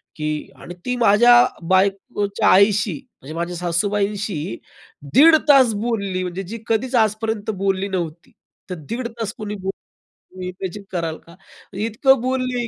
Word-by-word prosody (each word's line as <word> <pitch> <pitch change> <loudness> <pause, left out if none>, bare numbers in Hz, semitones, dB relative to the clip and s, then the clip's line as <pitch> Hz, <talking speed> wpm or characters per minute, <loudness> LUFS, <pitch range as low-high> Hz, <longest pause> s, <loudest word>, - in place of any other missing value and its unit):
की 155 -1 -4 0.3
आणि 175 - -9
ती 250 0 -1
माझ्या 235 +1 +5 0.4
बायकोच्या 200 +2 +1
आईशी 200 +2 +4 0.3
म्हणजे 140 +4 -9
माझ्या 170 +1 -3
सासूबाईंशी 195 - -2 0.6
दीड 315 +4 +8
तास 260 -6 +6
बोलली 200 -6 -2
म्हणजे 180 +2 -4
जी 210 +5 -7
कधीच 245 +3 0
आजपर्यंत 215 0 -3
बोलली 195 0 0
नव्हती. 170 -4 -5 0.4
तर 180 - -4
दीड 235 +2 -3
तास 220 -2 -3
कोणी 210 -1 -5
बोलेल, 190 -1 -4 0.6
तुम्ही 185 -1 -6
इमॅजिन 190 +2 -6
कराल 165 -3 -3
का? 170 - -15 0.5
इतकं 250 +3 +3
बोलली 255 -1 -1
200 Hz, 135 wpm, -21 LUFS, 185-230 Hz, 0.6 s, दीड